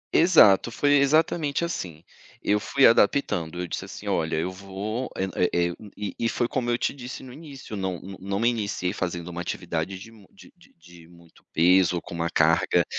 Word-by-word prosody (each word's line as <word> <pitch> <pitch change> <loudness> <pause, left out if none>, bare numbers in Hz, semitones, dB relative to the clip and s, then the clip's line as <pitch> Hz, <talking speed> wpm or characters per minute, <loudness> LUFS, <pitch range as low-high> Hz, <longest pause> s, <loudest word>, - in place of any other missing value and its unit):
Exato, 155 - +6
foi 145 +4 +2
exatamente 155 +2 +2
assim. 85 - -6 0.4
Eu 105 0 +1
fui 135 +5 +3
adaptando, 90 - +2
eu 90 - -2
disse - - -5
assim - - -10
olha, 80 0 0
eu 80 +4 -1
vou 100 +6 -5
é 95 - -1 0.3
é 85 0 +1
é 85 - -5 0.2
e 105 -3 -4
e 115 - +1
foi 120 - 0
como 125 -2 -2
eu 120 - +2
te - - -1
disse 130 -1 -8
no 125 -1 -11
início 140 -7 -10
não 95 -3 -3
não 95 +1 -9
não 100 +1 -3
me 115 - +2
iniciei 100 -5 -2
fazendo 90 -3 -4
uma 85 0 -5
atividade 85 +1 -4
de 110 +4 -12
mu 105 -4 -18
de - - -17
de - - -22
de 85 0 -17
muito 85 -1 -20
peso 90 +1 +4
com - - -11
uma 85 0 -2
carga - - +3
100 Hz, 200 wpm, -25 LUFS, 85-120 Hz, 0.4 s, Exato